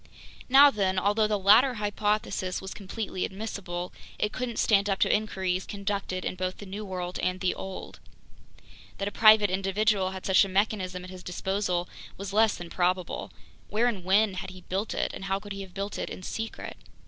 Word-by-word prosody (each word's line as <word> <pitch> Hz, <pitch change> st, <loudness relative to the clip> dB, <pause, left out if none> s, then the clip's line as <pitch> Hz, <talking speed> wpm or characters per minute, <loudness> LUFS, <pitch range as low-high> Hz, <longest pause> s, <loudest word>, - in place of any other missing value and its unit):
Now 280 Hz, +2 st, +8 dB
then, 190 Hz, -4 st, 0 dB
although 205 Hz, +3 st, +3 dB
the 210 Hz, -1 st, +1 dB
latter 220 Hz, +7 st, +6 dB
hypothesis 205 Hz, -3 st, -1 dB
was 190 Hz, 0 st, -7 dB
completely 200 Hz, -1 st, -4 dB
admissible, 190 Hz, -3 st, -5 dB, 0.2 s
it 210 Hz, -, 0 dB
couldn't 250 Hz, -3 st, -3 dB
stand 205 Hz, -1 st, +3 dB
up 195 Hz, -, +1 dB
to -, -, +4 dB
inquiries 190 Hz, -3 st, -1 dB
conducted 200 Hz, -2 st, -3 dB
in -, -, -1 dB
both 185 Hz, 0 st, -3 dB
the 205 Hz, -, -9 dB
New 200 Hz, +2 st, -6 dB
World 180 Hz, -2 st, -4 dB
and 185 Hz, 0 st, -1 dB
the 185 Hz, -1 st, +1 dB
Old. 190 Hz, 0 st, -7 dB, 1.0 s
That 195 Hz, -, -2 dB
a -, -, -2 dB
private 215 Hz, -2 st, +6 dB
individual 195 Hz, +1 st, +1 dB
had 190 Hz, 0 st, -7 dB
such 190 Hz, +2 st, +5 dB
a 195 Hz, -, -3 dB
mechanism 185 Hz, -2 st, 0 dB
at 185 Hz, -, -9 dB
his 185 Hz, -1 st, -9 dB
disposal 180 Hz, 0 st, -1 dB, 0.3 s
was 195 Hz, 0 st, -6 dB
less 220 Hz, 0 st, +4 dB
than 175 Hz, -1 st, -9 dB
probable. 180 Hz, 0 st, -1 dB, 0.4 s
Where 220 Hz, +3 st, +2 dB
and 220 Hz, -7 st, -1 dB
when 200 Hz, +3 st, +3 dB
had 185 Hz, 0 st, -5 dB
he 185 Hz, 0 st, -11 dB
built 195 Hz, +4 st, -3 dB
it, -, -, -1 dB
and 195 Hz, -, -6 dB
how 195 Hz, 0 st, 0 dB
could 205 Hz, 0 st, -11 dB
he 195 Hz, -, -6 dB
have 190 Hz, -2 st, -10 dB
built 200 Hz, 0 st, -4 dB
it -, -, -3 dB
in 185 Hz, -, -8 dB
secret? 225 Hz, +4 st, -5 dB
195 Hz, 195 wpm, -28 LUFS, 185-210 Hz, 1.0 s, Now